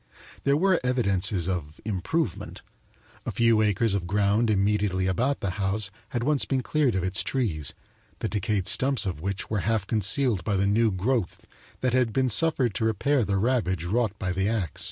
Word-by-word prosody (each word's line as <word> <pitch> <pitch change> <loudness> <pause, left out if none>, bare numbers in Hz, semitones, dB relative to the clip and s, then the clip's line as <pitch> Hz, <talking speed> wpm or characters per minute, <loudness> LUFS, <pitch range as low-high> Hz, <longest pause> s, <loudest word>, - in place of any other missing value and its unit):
There 140 +1 +3
were 185 +2 +3
evidences 100 -8 +1
of 80 -5 -4
"improvement" 110 - -3 0.6
a - - -4
few 115 -2 +3
acres 105 +1 +1
of 95 -3 -2
ground 105 +3 +1
immediately 100 -2 +1
about 125 +10 0
the 100 - -1
house 95 0 0 0.2
had 120 - -2
once 145 +1 +1
been 130 -2 -1
cleared 145 -6 +1
of 95 - -1
its 95 0 0
trees, 90 - -2 0.4
the - - -3
decayed 100 -2 -1
stumps 135 -3 +2
of 90 -6 -4
which 100 +3 -4
were 105 - 0
half 110 0 0
concealed 110 - +2
by 100 +3 -1
the 95 +1 +1
new 110 +3 +3
growth 105 +1 -2 0.4
that 130 -2 0
had 125 -4 +2
been 130 -1 +1
suffered 125 -1 +2
to 110 - -1
repair 120 +5 +1
the 100 -1 0
ravage 95 -6 0
wrought 105 +2 -1
by 95 -4 -3
the 95 +2 0
ax. 100 -9 -3
105 Hz, 180 wpm, -26 LUFS, 95-125 Hz, 0.6 s, There